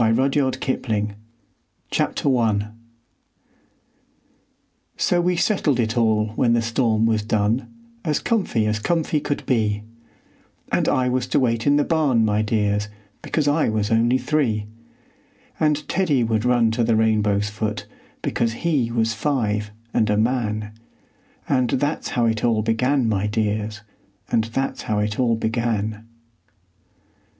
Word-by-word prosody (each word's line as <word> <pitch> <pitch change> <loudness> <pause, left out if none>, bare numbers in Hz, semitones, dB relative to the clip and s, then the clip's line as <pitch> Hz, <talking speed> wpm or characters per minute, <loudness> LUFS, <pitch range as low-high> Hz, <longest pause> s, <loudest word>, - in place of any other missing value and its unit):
RUDYARD 130 +4 +2
KIPLING 110 -5 -1 0.8
CHAPTER 135 -2 +1
I 105 -3 0 2.3
So 175 -1 +2
we 180 +1 +1
settled 165 - +1
it 110 -1 0
all 110 -2 +2
when 115 +2 +1
the 120 - +2
storm 115 -1 +1
was 110 -1 +2
done 110 +3 0 0.3
As 155 -3 0
comf'y 185 - 0
as 105 0 0
comf'y 155 +2 0
could 145 - -3
be; 105 -4 0 0.9
And - - +2
I 130 -1 +1
was 125 0 0
to - - +2
wait 115 -2 0
in 145 - +5
the 145 - +3
barn, 145 -9 +2
my 105 0 +1
dears, 105 -1 0 0.3
Because 150 -3 -1
I 150 -1 +2
was 110 -1 -1
only 115 +3 +3
three; 125 -5 0 0.9
And 150 -1 +1
Teddy 150 -10 +1
would 110 0 0
run 120 -2 +3
to 115 +1 0
the 115 0 +2
rainbow's 105 -2 +1
foot, 105 0 -3 0.4
Because 115 -1 0
he 140 -3 0
was 115 -1 +1
five 110 -7 -1 0.2
and 110 - +2
a 105 - +2
man; 110 -2 -1 0.8
And 130 -3 +1
that's 145 +6 -1
how 120 - +3
it 110 -1 0
all 115 -3 +2
began, 125 +3 +1
my 105 -2 0
dears, 105 0 -2 0.5
And 110 -1 +2
that's 135 +4 -3
how 110 - -2
it 105 +1 -1
all 120 -3 +3
began. 110 -1 -2
115 Hz, 140 wpm, -22 LUFS, 110-130 Hz, 2.3 s, in